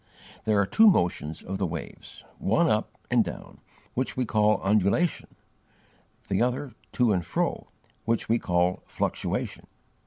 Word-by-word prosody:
There 105 -2 +3
are 100 - +3
two 220 - +5
motions 85 - +1
of 95 +1 -5
the 95 - 0
waves 80 -2 -8 0.2
one - - +2
up - - 0
and - - +5
down, - - -9 0.3
which 130 +1 -2
we 130 - +1
call 105 -1 +2
undulation, 105 - +1 0.9
the 95 - 0
other 125 +2 -1 0.2
to 120 -4 +3
and 90 -2 0
fro, - - -2 0.4
which 115 0 0
we 115 +1 +2
call 90 0 +1
fluctuation. - - -3
105 Hz, 145 wpm, -27 LUFS, 90-120 Hz, 0.9 s, two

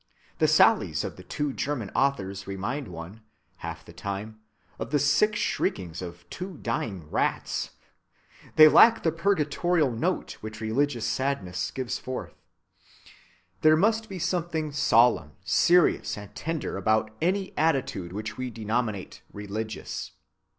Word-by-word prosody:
The - - +4
sallies - - +4
of - - -5
the - - -11
two 145 +9 -3
German 130 -9 -3
authors 100 -8 0
remind 110 +8 -3
one, 85 +5 -9 0.4
half - - -7
the - - -13
time, 105 +2 -5 0.4
of - - -4
the 145 - +2
sick 150 +10 +3
shriekings 90 - -1
of 85 -1 -9
two 185 -2 -6
dying 100 -8 -3
rats. - - -1 0.9
They 155 0 +10
lack 230 +8 +7
the 160 - +3
purgatorial 165 -3 +1
note 165 +11 -2
which 110 0 -7
religious 120 +2 0
sadness 95 -10 -1
gives 130 -2 -3
forth. 130 0 -6 1.3
There 155 0 +6
must 220 +4 +2
be 195 - -6
something 170 -3 -1
solemn, 115 - +3
serious, 175 - +3
and 105 0 -10
tender 160 +6 -3
about 110 0 +1
any 190 +3 0
attitude 135 - 0
which 105 +2 -5
we 130 0 -3
denominate 110 -3 -3
religious. 105 +1 -5
125 Hz, 130 wpm, -27 LUFS, 105-155 Hz, 1.3 s, They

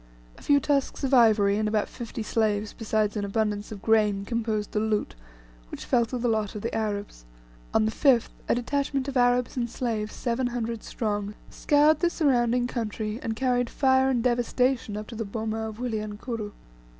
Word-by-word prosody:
A - - -17
few 285 -1 +4
tusks 280 0 -1
of 270 0 0
ivory, 215 -5 +5
and 215 - 0
about 210 0 0
fifty 230 -2 -6
slaves, 215 -1 0
besides 215 -2 0
an 210 - -2
abundance 205 0 -1
of 200 -2 -8
grain, 210 -3 +2
composed 220 -2 -2
the 210 - 0
"loot," 215 -1 -1 0.6
which - - -8
fell 240 -2 +3
to 250 - -4
the 245 0 -1
lot 215 -3 0
of 210 - -6
the 230 - -3
Arabs. 205 - -3 0.5
On 215 - +3
the 220 - 0
5th, 250 -1 +3 0.2
a - - +4
detachment 275 +2 -1
of 275 - -4
Arabs 245 0 +2
and 240 -1 -1
slaves, 225 -3 -3
seven 245 +1 -1
hundred 235 -2 -3
strong, 205 -2 -3 0.2
scoured 295 +1 +3
the 345 - +2
surrounding 250 -7 +2
country, 220 -2 -3
and 225 -1 -3
carried 245 -1 +1
fire 265 -1 +3
and 245 -3 +1
devastation 245 -2 +1
up 210 - -5
to 235 - -11
the 225 - -3
boma 220 +1 -3
of 215 - -10
Wilyankuru. 220 -1 -4
225 Hz, 185 wpm, -26 LUFS, 215-250 Hz, 0.6 s, ivory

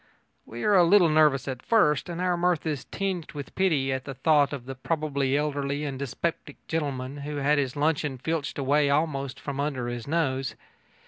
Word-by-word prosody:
We 120 +1 -7
are 210 - +3
a 185 -3 +7
little 175 0 +5
nervous 150 -3 +3
at 130 -2 -4
first, 150 -9 +2
and 170 0 -5
our 180 -1 +1
mirth 175 -2 +1
is 150 -5 -2
tinged 190 -4 -3
with 145 -2 -7
pity 150 -8 +1
at 130 0 -4
the 135 - -6
thought 145 +1 +3
of 135 -4 -6
the 135 - -5
probably 140 -1 -1
elderly 145 -1 -1
and 135 -2 -4
dyspeptic 140 +5 -4
gentleman 140 -4 -3
who 145 +1 -5
has 145 - -3
had 150 +1 +4
his 130 -2 -1
luncheon 150 -2 0
filched 145 0 -3
away 145 +1 +2
almost 140 -2 0
from 140 -1 -5
under 140 -4 -2
his 120 0 -5
nose. 135 -4 -1
145 Hz, 195 wpm, -26 LUFS, 135-160 Hz, -, a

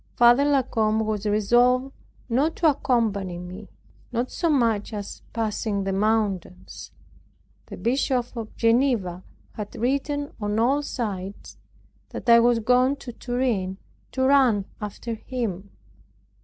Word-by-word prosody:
Father 240 +4 +6
La 280 -2 +3
Combe 220 -3 0
was 215 -1 -2
resolved 245 +5 +3 0.3
not 275 +7 +1
to 330 - +2
accompany 220 - 0
me, 180 +4 -9 0.4
not 245 +1 -2
so 340 - 0
much 230 -7 +1
as 205 -1 -6
passing 215 -2 -2
the 195 0 -2
mountains. 200 -3 -2 0.8
The - - -8
Bishop 250 0 0
of 225 -2 -7
Geneva 230 -7 +2 0.3
had 210 -1 -7
written 285 +4 -1
on 210 +1 -1
all 260 +6 +2
sides 205 -8 -5 0.5
that - - -8
I 235 0 +8
was 240 0 +4
gone 250 +4 +3
to 245 -3 -9
Turin 235 -7 -2 0.4
to 260 - 0
run 260 -7 +4 0.2
after 210 +3 -5
him. 215 -5 -4
230 Hz, 130 wpm, -24 LUFS, 205-255 Hz, 0.8 s, I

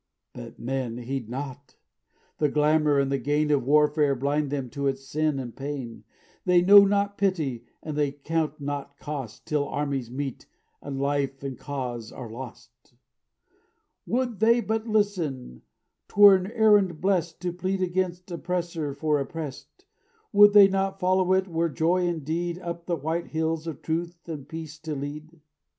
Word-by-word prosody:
"But 120 -2 -10
men 125 -1 -3
heed 125 -1 -4
not; 135 +2 -7 0.6
the 150 - +3
glamor 150 0 +3
and 140 0 +1
the 140 - +1
gain 150 +4 +1
Of 145 -3 +2
warfare 150 -1 +4
blind 145 +3 0
them 140 -2 -3
to 140 0 -2
its 135 0 -2
sin 155 +1 0
and 125 -3 -6
pain; 135 -4 -6 0.4
They 180 -1 +4
know 200 +2 +9
not 200 0 0
pity 155 - 0 0.2
and 155 -2 -5
they 145 -2 +1
count 155 +1 -2
not 140 0 -5
cost 140 -7 -7
Till 145 -2 0
armies 140 -4 -2
meet 135 +1 -5 0.3
and 135 -1 -5
life 140 -1 -1
and 135 -2 -4
cause 125 -6 -5
are 115 -3 -8
lost. 120 0 -11 1.1
"Would 245 -3 -1
they 230 +2 +5
but 220 +1 -2
listen 175 - -1 0.5
'twere 205 -1 +8
an 185 -1 +1
errand 205 -7 +4
blest 175 -2 0
To 180 -1 -2
plead 185 +1 -2
against 180 0 -2
oppressor 170 -4 -3
for 150 0 +1
oppressed; 145 - -7 0.5
Would 205 0 +8
they 205 -2 +9
but 195 0 -1
follow 185 0 +2
it 190 0 +2
were 165 -1 0
joy 175 +4 +1
indeed 170 +1 -2
Up 170 -1 -6
the 175 - +1
white 160 +3 -3
hills 160 0 -2
of 160 -4 -6
truth 170 +2 -3
and 150 -4 -7
peace 160 -1 -7
to 155 -1 -5
lead. 150 +4 -7
155 Hz, 160 wpm, -26 LUFS, 140-180 Hz, 1.1 s, know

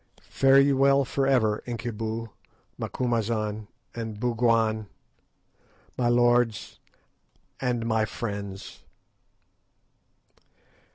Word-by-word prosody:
Fare 135 0 +5
ye 140 0 +4
well 135 +1 +4
for 135 +1 -1
ever, 110 -6 +2
Incubu, 115 -1 -4 0.5
Macumazahn, 110 -3 -2 0.3
and 110 -3 -6
Bougwan, 115 -2 +1 1.1
my 120 -1 +1
lords 120 -2 +2 0.8
and 120 -3 -1
my 110 -1 +1
friends." 100 -4 -6
115 Hz, 75 wpm, -26 LUFS, 110-125 Hz, 1.1 s, Fare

